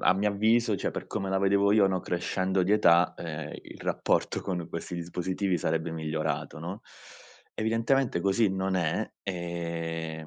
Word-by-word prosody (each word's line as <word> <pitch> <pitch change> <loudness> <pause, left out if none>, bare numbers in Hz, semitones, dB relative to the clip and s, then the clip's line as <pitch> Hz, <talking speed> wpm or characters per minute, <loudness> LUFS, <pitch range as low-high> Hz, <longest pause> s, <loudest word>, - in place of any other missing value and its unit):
a - - +4
mio 105 +2 +1
avviso, 110 +2 +3
cioè 95 - -1
per - - -6
come 100 -3 -3
la 95 - +1
vedevo 100 +1 +3
io, 105 -1 +5
no, 95 -1 0
crescendo 95 +2 0
di 95 +3 +2
età, 85 -5 +5
ehm, 80 -2 -6
il - - -12
rapporto - - 0
con 90 -3 -3
questi 85 +2 -5
dispositivi 90 +2 -1
sarebbe 80 +1 -1
migliorato 80 -1 -2
no, 90 +6 -6 0.7
evidentemente 115 0 +1
così 100 +3 +3
non 95 0 -1
è, 85 -3 0 0.2
e 85 -3 -4
90 Hz, 160 wpm, -28 LUFS, 85-100 Hz, 0.7 s, io